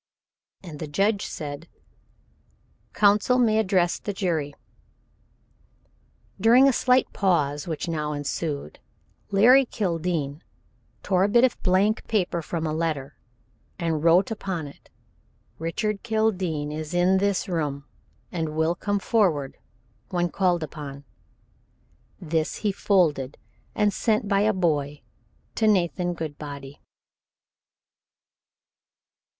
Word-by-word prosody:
And 160 Hz, -5 st, -9 dB
the 155 Hz, -, -5 dB
judge 200 Hz, +7 st, 0 dB
said: 145 Hz, +1 st, -7 dB, 1.2 s
"Counsel 210 Hz, +4 st, +3 dB
may 220 Hz, -3 st, +3 dB
address 185 Hz, -4 st, +1 dB
the 205 Hz, -, -4 dB
jury." 160 Hz, -7 st, -2 dB, 1.8 s
During 240 Hz, +6 st, +6 dB
a 270 Hz, -, +4 dB
slight 250 Hz, +1 st, +2 dB
pause 150 Hz, -7 st, 0 dB
which 160 Hz, +1 st, -3 dB
now 150 Hz, -2 st, -2 dB
ensued 145 Hz, -, -4 dB, 0.5 s
Larry 240 Hz, +7 st, +6 dB
Kildene 165 Hz, -, -2 dB, 0.6 s
tore 185 Hz, -1 st, +2 dB
a -, -, +3 dB
bit 235 Hz, +4 st, +4 dB
of 260 Hz, -, +1 dB
blank 195 Hz, +4 st, +1 dB
paper 180 Hz, -6 st, 0 dB
from 165 Hz, 0 st, -4 dB
a 155 Hz, -, -1 dB
letter 155 Hz, -4 st, -2 dB, 0.6 s
and 165 Hz, -4 st, -1 dB
wrote 175 Hz, +5 st, +4 dB
upon 190 Hz, -7 st, -4 dB
it: 140 Hz, -, -14 dB, 0.7 s
"Richard 200 Hz, +6 st, -2 dB
Kildene 190 Hz, -10 st, -1 dB
is 155 Hz, +2 st, -5 dB
in 185 Hz, +2 st, +3 dB
this 200 Hz, +1 st, 0 dB
room 145 Hz, -6 st, -2 dB, 0.5 s
and 160 Hz, -3 st, -3 dB
will 160 Hz, +1 st, +2 dB
come 205 Hz, +3 st, -2 dB
forward 180 Hz, -, +1 dB, 0.5 s
when 175 Hz, -1 st, 0 dB
called 175 Hz, -2 st, +1 dB
upon." 145 Hz, -3 st, -8 dB, 1.2 s
This 160 Hz, -2 st, -1 dB
he 205 Hz, -, +3 dB
folded 165 Hz, -9 st, +1 dB, 0.4 s
and 210 Hz, -1 st, +2 dB
sent 215 Hz, -2 st, 0 dB
by 200 Hz, -1 st, +2 dB
a 215 Hz, +2 st, +3 dB
boy 150 Hz, -7 st, -1 dB, 0.5 s
to 220 Hz, -, +1 dB
Nathan 175 Hz, -3 st, +1 dB
Goodbody. 145 Hz, -3 st, -7 dB
175 Hz, 110 wpm, -25 LUFS, 155-205 Hz, 1.8 s, During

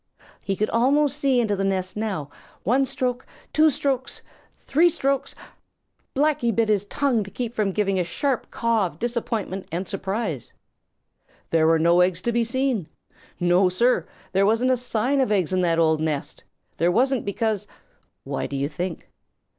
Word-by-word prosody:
He 195 Hz, -, -2 dB
could 215 Hz, +3 st, -1 dB
almost 275 Hz, +4 st, +3 dB
see 275 Hz, -3 st, +2 dB
into 215 Hz, -4 st, +1 dB
the 195 Hz, -, -2 dB
nest 190 Hz, -1 st, -1 dB
now. 195 Hz, -10 st, -3 dB, 0.3 s
One 260 Hz, +7 st, +3 dB
stroke! 250 Hz, -1 st, -2 dB, 0.3 s
Two 310 Hz, 0 st, +5 dB
strokes! 270 Hz, -2 st, -2 dB, 0.4 s
Three 330 Hz, +5 st, +4 dB
strokes! 275 Hz, -3 st, -1 dB, 0.8 s
Blacky 285 Hz, -4 st, +2 dB
bit 225 Hz, 0 st, +1 dB
his 205 Hz, -2 st, +2 dB
tongue 250 Hz, -1 st, 0 dB
to 195 Hz, -, -9 dB
keep 235 Hz, +2 st, -4 dB
from 210 Hz, -4 st, 0 dB
giving 195 Hz, -1 st, 0 dB
a -, -, +2 dB
sharp 260 Hz, -, -2 dB
caw 230 Hz, -4 st, +1 dB
of 155 Hz, -, -13 dB
disappointment 225 Hz, -4 st, -3 dB
and 175 Hz, +3 st, -3 dB
surprise. 195 Hz, -, -3 dB, 1.0 s
There 160 Hz, -1 st, +4 dB
were 165 Hz, 0 st, +5 dB
no 170 Hz, +2 st, +4 dB
eggs 180 Hz, 0 st, +1 dB
to 240 Hz, -, +1 dB
be 235 Hz, 0 st, +2 dB
seen. 240 Hz, -, -1 dB, 0.5 s
No, 175 Hz, +2 st, +4 dB
Sir, 185 Hz, -1 st, +2 dB, 0.2 s
there 195 Hz, +1 st, +3 dB
wasn't 230 Hz, +4 st, +2 dB
a 255 Hz, -, +3 dB
sign 250 Hz, +3 st, 0 dB
of 255 Hz, -, +1 dB
eggs 190 Hz, -4 st, +1 dB
in 185 Hz, -, +2 dB
that 170 Hz, -2 st, +2 dB
old 160 Hz, -2 st, +3 dB
nest. 155 Hz, -3 st, -3 dB, 0.3 s
There 170 Hz, +2 st, +2 dB
wasn't 260 Hz, +4 st, +2 dB
because 210 Hz, 0 st, -1 dB, 0.6 s
why, -, -, -3 dB
do 140 Hz, -, -6 dB
you 140 Hz, +1 st, -1 dB
think? 175 Hz, +3 st, -5 dB
215 Hz, 170 wpm, -24 LUFS, 180-250 Hz, 1.0 s, Two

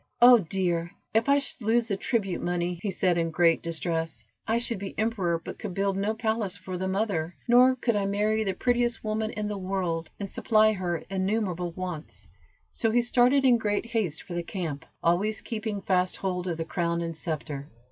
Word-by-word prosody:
"Oh 245 Hz, 0 st, +9 dB
dear! 175 Hz, -1 st, -1 dB, 0.2 s
if 225 Hz, +5 st, +2 dB
I 280 Hz, -, +6 dB
should 275 Hz, -2 st, -2 dB
lose 230 Hz, +2 st, +2 dB
the 200 Hz, -, +1 dB
tribute 195 Hz, -2 st, -1 dB
money," 175 Hz, 0 st, -1 dB
he 205 Hz, -, -2 dB
said, 180 Hz, -2 st, +1 dB
in 165 Hz, 0 st, 0 dB
great 165 Hz, 0 st, +3 dB
distress; 165 Hz, 0 st, -3 dB, 0.2 s
"I 225 Hz, +1 st, +2 dB
should 235 Hz, -3 st, -1 dB
be 195 Hz, 0 st, -6 dB
emperor 200 Hz, -6 st, +1 dB
but 165 Hz, -, -9 dB
could 180 Hz, -, -5 dB
build 195 Hz, 0 st, +1 dB
no 205 Hz, +3 st, 0 dB
palace 220 Hz, -3 st, -1 dB
for 185 Hz, 0 st, -6 dB
the 190 Hz, +1 st, -2 dB
mother, 190 Hz, -4 st, -1 dB
nor 250 Hz, +2 st, +6 dB
could 240 Hz, -3 st, 0 dB
I 200 Hz, -1 st, +1 dB
marry 210 Hz, +2 st, +1 dB
the 195 Hz, -3 st, -1 dB
prettiest 240 Hz, +1 st, +1 dB
woman 215 Hz, 0 st, -1 dB
in 210 Hz, -1 st, -3 dB
the 205 Hz, -1 st, -3 dB
world, 180 Hz, -4 st, -2 dB
and 200 Hz, -, -3 dB
supply 215 Hz, +2 st, +3 dB
her 175 Hz, -4 st, -2 dB
innumerable 190 Hz, -3 st, -1 dB
wants;" 180 Hz, -4 st, -6 dB, 0.4 s
so 225 Hz, -, 0 dB
he 240 Hz, +2 st, +3 dB
started 250 Hz, +3 st, +4 dB
in 245 Hz, -2 st, +5 dB
great 205 Hz, 0 st, 0 dB
haste 215 Hz, -9 st, -2 dB
for 180 Hz, -, -8 dB
the 175 Hz, -, -1 dB
camp, 170 Hz, -5 st, -5 dB, 0.2 s
always 200 Hz, +6 st, +2 dB
keeping 215 Hz, -3 st, -4 dB
fast 185 Hz, -1 st, +1 dB
hold 185 Hz, -1 st, -2 dB
of 170 Hz, -2 st, -2 dB
the 165 Hz, -, -3 dB
crown 170 Hz, 0 st, -1 dB
and 165 Hz, -1 st, -4 dB
scepter. 150 Hz, -3 st, -4 dB
195 Hz, 200 wpm, -27 LUFS, 175-220 Hz, 0.4 s, Oh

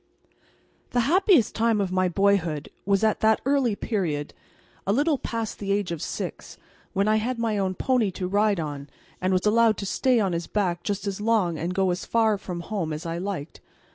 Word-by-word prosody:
The 245 Hz, -, +3 dB
happiest 345 Hz, -, +4 dB
time 225 Hz, -1 st, +2 dB
of 195 Hz, -2 st, -1 dB
my 185 Hz, 0 st, +2 dB
boyhood 175 Hz, -6 st, +1 dB, 0.2 s
was 200 Hz, +1 st, +2 dB
at 220 Hz, -1 st, +2 dB
that 220 Hz, 0 st, +3 dB
early 270 Hz, -6 st, +2 dB
period, 165 Hz, -11 st, -2 dB, 0.5 s
a -, -, +3 dB
little 285 Hz, +5 st, +2 dB
past 225 Hz, -2 st, -4 dB
the 200 Hz, -1 st, -2 dB
age 200 Hz, -3 st, 0 dB
of 165 Hz, -3 st, -4 dB
six, -, -, -5 dB, 0.4 s
when 200 Hz, +1 st, +1 dB
I 215 Hz, 0 st, +4 dB
had 240 Hz, +3 st, -1 dB
my 225 Hz, -3 st, 0 dB
own 190 Hz, -1 st, -1 dB
pony 245 Hz, -1 st, +1 dB
to 180 Hz, -, -3 dB
ride 205 Hz, 0 st, +2 dB
on, 145 Hz, -3 st, -5 dB, 0.3 s
and 185 Hz, +1 st, +1 dB
was 185 Hz, +1 st, +1 dB
allowed 225 Hz, 0 st, +4 dB
to 200 Hz, -, -4 dB
stay 250 Hz, +4 st, +2 dB
on 195 Hz, -4 st, +1 dB
his 170 Hz, 0 st, -3 dB
back 180 Hz, -5 st, -1 dB
just 200 Hz, +1 st, -3 dB
as 200 Hz, 0 st, -3 dB
long 210 Hz, -7 st, +1 dB
and 175 Hz, +3 st, -3 dB
go 190 Hz, -1 st, +2 dB
as 175 Hz, +2 st, -3 dB
far 220 Hz, -3 st, +2 dB
from 180 Hz, -3 st, -5 dB
home 175 Hz, -3 st, -3 dB
as 155 Hz, +4 st, -6 dB
I 165 Hz, 0 st, -3 dB
liked. 180 Hz, -5 st, -5 dB
200 Hz, 200 wpm, -25 LUFS, 180-225 Hz, 0.5 s, happiest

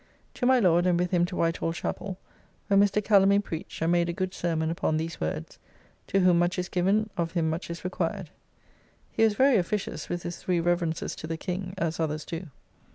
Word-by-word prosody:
To 245 Hz, -, -1 dB
my 260 Hz, -1 st, +5 dB
Lord, 175 Hz, -3 st, +4 dB
and 175 Hz, -1 st, +3 dB
with 180 Hz, 0 st, 0 dB
him 175 Hz, -1 st, +3 dB
to 180 Hz, -, -6 dB
White 165 Hz, -1 st, +1 dB
Hall 165 Hz, -, -1 dB
Chappell, 185 Hz, +2 st, -4 dB, 0.5 s
where 195 Hz, 0 st, +4 dB
Mr. 205 Hz, +1 st, +3 dB
Calamy 200 Hz, -1 st, +5 dB
preached, 165 Hz, -4 st, -5 dB
and 165 Hz, -, +2 dB
made 175 Hz, 0 st, +2 dB
a -, -, -1 dB
good 185 Hz, +1 st, -3 dB
sermon 160 Hz, -3 st, -1 dB
upon 160 Hz, -1 st, 0 dB
these 165 Hz, +1 st, -4 dB
words 80 Hz, 0 st, -4 dB, 0.5 s
"To 195 Hz, -, +2 dB
whom 180 Hz, -2 st, +5 dB
much 175 Hz, +2 st, +1 dB
is 180 Hz, 0 st, -2 dB
given, 200 Hz, +4 st, +1 dB
of 170 Hz, -1 st, -1 dB
him 165 Hz, -3 st, +1 dB
much 165 Hz, +3 st, -4 dB
is 170 Hz, 0 st, -6 dB
required." 185 Hz, -1 st, -3 dB, 0.8 s
He -, -, +1 dB
was 220 Hz, -2 st, +4 dB
very 265 Hz, +1 st, +5 dB
officious 195 Hz, +2 st, -2 dB
with 175 Hz, 0 st, -3 dB
his 175 Hz, -, -5 dB
three 180 Hz, -2 st, 0 dB
reverences 170 Hz, -1 st, 0 dB
to 155 Hz, -, -6 dB
the 165 Hz, 0 st, -3 dB
King, 185 Hz, +2 st, -4 dB
as 165 Hz, -2 st, -2 dB
others 155 Hz, -1 st, -2 dB
do. 170 Hz, +2 st, -6 dB
175 Hz, 215 wpm, -27 LUFS, 165-195 Hz, 0.8 s, my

